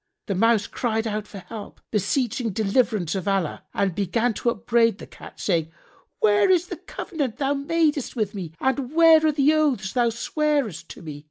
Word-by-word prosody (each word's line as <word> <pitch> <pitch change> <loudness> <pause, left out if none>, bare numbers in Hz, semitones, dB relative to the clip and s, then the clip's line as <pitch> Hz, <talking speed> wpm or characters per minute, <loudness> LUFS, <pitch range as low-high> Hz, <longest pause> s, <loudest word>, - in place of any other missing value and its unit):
[FN#63] - - -55
The 200 - -2
Mouse 225 +1 +3
cried 225 -2 -2
out 215 -1 -3
for 200 - -10
help, 210 +2 -9
beseeching 230 +3 0
deliverance 210 -3 +1
of 190 0 -4
Allah 195 -5 -1
and 195 -3 0
began 225 +6 0
to 235 - 0
upbraid 230 -1 +2
the - - -9
Cat, - - -13
saying, 165 -4 0 0.5
"Where 210 - +4
is 360 -1 +3
the - - -5
covenant 285 -9 -4
thou 280 -1 +1
madest 295 -1 0
with 215 -4 -1
me 180 -6 -6
and 265 +2 -1
where 325 -1 +7
are 310 - +4
the 290 +1 +3
oaths 270 -11 +1
thou 240 -2 +3
swarest 280 - -1
to - - -10
me? 150 -3 -7
230 Hz, 185 wpm, -24 LUFS, 200-280 Hz, 0.5 s, where